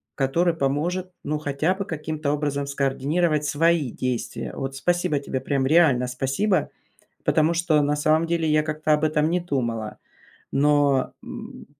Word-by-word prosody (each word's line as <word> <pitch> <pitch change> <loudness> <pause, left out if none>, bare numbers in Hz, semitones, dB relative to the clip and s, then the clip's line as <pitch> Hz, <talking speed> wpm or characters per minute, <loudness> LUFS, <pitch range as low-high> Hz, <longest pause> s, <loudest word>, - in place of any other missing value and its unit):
который 165 +6 +1
поможет, 165 +6 -1
ну, 150 +1 -2
хотя 150 +5 0
бы 200 - -3
каким-то 155 -2 -3
образом 145 -1 -1
скоординировать 145 +3 0
свои 155 -2 +2
действия. 125 0 -3
Вот 135 0 -4
спасибо 175 +1 0
тебе, 135 -2 -4
прям 135 -2 0
реально 140 -5 +4
спасибо, 135 +11 0 0.6
потому 160 +1 +3
что 165 -3 +2
на 145 +1 +1
самом 155 +2 +2
деле 165 -1 0
я 155 0 +3
как-то 155 0 -1
об 150 +1 +1
этом 155 0 +1
не 180 +1 +1
думала, 120 -9 -3 0.5
но 145 -1 +2
м - - -9
150 Hz, 150 wpm, -24 LUFS, 140-165 Hz, 0.6 s, реально